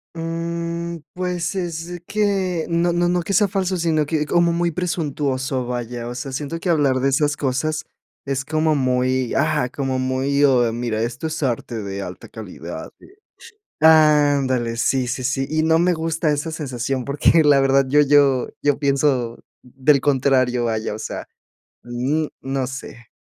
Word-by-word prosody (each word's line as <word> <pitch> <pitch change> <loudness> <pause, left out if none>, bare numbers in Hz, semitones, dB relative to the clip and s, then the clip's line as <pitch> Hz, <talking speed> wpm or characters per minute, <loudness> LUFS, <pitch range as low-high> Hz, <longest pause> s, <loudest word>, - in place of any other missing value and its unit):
Mm, 170 0 -4
pues, 180 +1 -2
es 175 -1 -4
que 195 -5 0
no 170 +1 +1
no 175 0 +2
no 175 0 +1
que 185 +4 -3
sea 205 0 +4
falso, 190 -1 -1
sino 160 -3 +1
que 150 0 -1
como 170 +2 +2
muy 170 0 0
presuntuoso, 140 -7 -2
vaya. 120 -1 -4
O 120 - -6
sea, 130 +2 -5
siento 150 +5 -4
que 180 - -3
hablar 145 -5 +3
de 135 - +2
esas 145 +2 +1
cosas 145 +3 -1 0.4
es 135 -1 -2
como 155 +1 +1
muy, 130 -1 0
ah, 150 -3 +1
como 135 -2 -2
muy, 135 +2 0
oh, 125 -4 +4
mira: 115 -2 -2
"Esto 120 +7 -3
es 160 -1 -4
arte 120 -3 -2
de 100 0 -5
alta - - -8
calidad", - - -8
eh, - - -16 0.7
sh, - - -2
ándale, 145 -6 +4
sí, 130 +2 +1
sí, 130 +1 -3
sí. 135 +1 0
Y 155 0 +1
no 160 0 +3
me 175 +1 +3
gusta 160 -1 -1
esa 150 +2 -1
sensación 135 -4 -3
porque, 145 +4 +3
la 145 -2 +5
verdad, 135 0 +3
yo 145 +3 +4
yo 140 -3 +3
yo 145 -1 +2
pienso 135 -4 0 0.2
del 135 +3 +2
contrario, 130 -3 +2
vaya, 110 -2 -2
o 105 - -7
sea, - - -6 0.6
n 130 +6 -1
no 135 -1 -2
sé. 130 -3 -9
145 Hz, 170 wpm, -21 LUFS, 130-165 Hz, 0.7 s, la